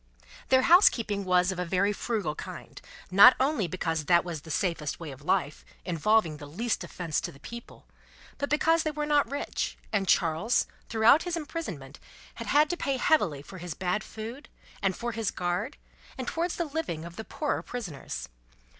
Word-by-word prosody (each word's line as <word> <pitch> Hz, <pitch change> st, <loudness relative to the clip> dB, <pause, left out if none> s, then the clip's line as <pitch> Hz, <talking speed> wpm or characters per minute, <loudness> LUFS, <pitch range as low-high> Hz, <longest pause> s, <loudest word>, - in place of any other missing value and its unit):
Their 260 Hz, 0 st, +5 dB
housekeeping 230 Hz, -, +4 dB
was 180 Hz, 0 st, +3 dB
of 185 Hz, -, -5 dB
a -, -, 0 dB
very 190 Hz, +4 st, +1 dB
frugal 205 Hz, -8 st, -2 dB
kind: -, -, -9 dB, 0.3 s
not 205 Hz, +7 st, +9 dB
only 260 Hz, -, +1 dB
because 165 Hz, -3 st, -2 dB
that 170 Hz, +2 st, +4 dB
was 165 Hz, -4 st, -5 dB
the 160 Hz, -, -13 dB
safest 160 Hz, -3 st, -1 dB
way 165 Hz, -4 st, -6 dB
of 135 Hz, +1 st, -11 dB
life, 165 Hz, -2 st, 0 dB, 0.2 s
involving 175 Hz, -1 st, +2 dB
the 145 Hz, -1 st, -9 dB
least 220 Hz, +11 st, -2 dB
offence 165 Hz, -4 st, -3 dB
to -, -, -4 dB
the 135 Hz, -, -16 dB
people, 235 Hz, +10 st, -10 dB, 0.5 s
but 285 Hz, -, -2 dB
because 325 Hz, +2 st, +3 dB
they 315 Hz, -, -1 dB
were 300 Hz, 0 st, -3 dB
not 295 Hz, -1 st, +2 dB
rich, 285 Hz, +1 st, -3 dB, 0.2 s
and 195 Hz, -2 st, +1 dB
Charles, 170 Hz, +8 st, +2 dB, 0.2 s
throughout 230 Hz, +7 st, +5 dB
his 350 Hz, -2 st, -2 dB
imprisonment, 290 Hz, -, -6 dB, 0.3 s
had -, -, -8 dB
had 300 Hz, +1 st, +4 dB
to 350 Hz, -, -2 dB
pay 275 Hz, -4 st, -1 dB
heavily 200 Hz, -, +2 dB
for 190 Hz, +5 st, -11 dB
his 175 Hz, -2 st, -6 dB
bad 185 Hz, +2 st, -1 dB
food, 230 Hz, +7 st, -8 dB, 0.3 s
and 190 Hz, -2 st, +1 dB
for 240 Hz, 0 st, -3 dB
his 225 Hz, -2 st, -1 dB
guard, 180 Hz, +10 st, -2 dB, 0.4 s
and 255 Hz, -2 st, -5 dB
towards 335 Hz, +1 st, -1 dB
the 340 Hz, -, -1 dB
living 290 Hz, -, -4 dB
of 170 Hz, 0 st, -9 dB
the 220 Hz, -, -6 dB
poorer 295 Hz, +6 st, -2 dB
prisoners. 180 Hz, -, -6 dB
205 Hz, 180 wpm, -28 LUFS, 170-275 Hz, 0.5 s, not